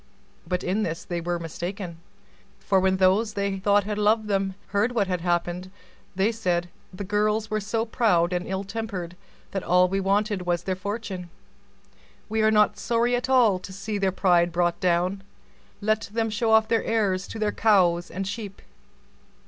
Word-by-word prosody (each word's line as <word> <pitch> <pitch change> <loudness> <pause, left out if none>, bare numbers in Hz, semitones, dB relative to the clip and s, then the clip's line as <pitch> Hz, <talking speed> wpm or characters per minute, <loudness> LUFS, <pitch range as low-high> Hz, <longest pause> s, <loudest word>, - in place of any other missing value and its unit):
But 180 +1 -1
in 195 +4 0
this 165 -4 -3
they 175 -1 -3
were 175 +1 -1
mistaken; 170 +1 -6 0.6
for 195 -1 +1
when 190 0 +2
the 185 0 +5
lovers 205 0 +1 0.2
heard 210 +4 +1
what 215 -4 +2
had 180 -2 -2
happened, 175 +1 -1 0.5
they 195 +4 +2
said, 180 -6 -1 0.2
"The 185 +2 -6
girls 210 +2 0
were 215 - +1
so 220 +2 -1
proud 185 -7 +2
and 180 0 -2
ill 190 +1 -2
tempered, 195 -4 -5 0.4
that 195 - -2
all 180 +1 +4
we 195 +2 -1
wanted 200 +1 +1
was 175 -1 -1
their 185 0 -1
fortune; 195 -2 -5 1.0
we 220 +1 0
are 215 - +4
not 210 -1 +3
sorry 235 +2 +1
at 245 +2 -2
all 235 -8 +4
to 190 - -10
see 200 +2 -4
their 195 -1 +1
pride 175 -2 +3
brought 175 0 0
down; 180 +2 +1 0.6
let 215 +1 0
them 225 0 -1
show 220 +2 0
off 220 0 +5
their 230 0 +1
airs 195 -4 0
to - - -7
their 215 -1 0
cows 180 -6 +3
and 195 +1 -4
sheep." 205 -1 -6
195 Hz, 165 wpm, -25 LUFS, 180-215 Hz, 1.0 s, the